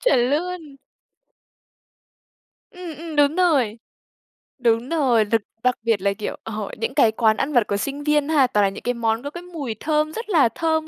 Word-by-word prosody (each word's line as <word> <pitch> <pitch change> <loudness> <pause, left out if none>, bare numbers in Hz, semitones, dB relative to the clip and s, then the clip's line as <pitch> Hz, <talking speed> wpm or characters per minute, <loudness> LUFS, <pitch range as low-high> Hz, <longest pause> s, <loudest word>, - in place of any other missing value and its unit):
Chuẩn 250 - +3
luôn! 320 -1 -3 2.0
Ừm, 355 -4 -8
ừm, 320 0 -7
đúng 290 +2 +3
rồi. 275 - +2 0.8
Đúng 235 0 +1
rồi, 260 -9 +2
đặc 225 +1 +1 0.2
đặc 250 0 +3
biệt 225 -4 +1
là, 200 +1 +1
kiểu, 210 +1 -5
ờ, 215 -2 -5
những 225 - -3
cái 225 - +4
quán 220 -1 +2
ăn 290 +2 -2
vặt 240 -4 +3
của 200 - -1
sinh 280 +7 -4
viên 300 0 +1
ha, 290 -5 +4
toàn 210 -5 +2
là - - +2
những 195 - -9
cái 245 - 0
món 230 0 -1
có 285 - -4
cái 345 +4 -9
mùi 305 -10 -6
thơm 305 0 0
rất 455 +3 -6
là 310 - +4
thơm 320 +5 -1
270 Hz, 195 wpm, -22 LUFS, 225-315 Hz, 2.0 s, cái